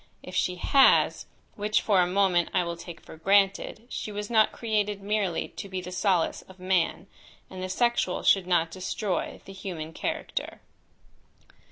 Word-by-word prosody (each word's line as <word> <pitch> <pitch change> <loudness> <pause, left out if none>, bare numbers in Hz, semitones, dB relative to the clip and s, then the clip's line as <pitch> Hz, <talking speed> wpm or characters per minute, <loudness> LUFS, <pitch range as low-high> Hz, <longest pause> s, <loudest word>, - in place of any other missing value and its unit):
If 180 - -10
she 180 - +1
has, 270 +9 +4 0.3
which, 210 +1 +1
for 200 -4 +3
a 175 - +2
moment, 180 -2 +2
I 180 - +3
will 170 0 -4
take 170 0 -10
for - - -13
granted, 195 +5 +2
she 215 - -5
was 210 +2 -5
not 220 -2 +4
created 210 -3 -1
merely 200 -4 -1
to 200 - -8
be 190 -1 -3
the 180 0 -7
solace 185 -2 +1
of 190 - -14
man, 185 -1 0 0.5
and 185 -1 -7
the 185 - -4
sexual 235 -3 0
should 190 -2 +4
not 170 -2 +2
destroy 185 +2 -3
the 195 - -10
human 165 -5 -6
character. - - -4
190 Hz, 165 wpm, -27 LUFS, 180-205 Hz, 0.5 s, has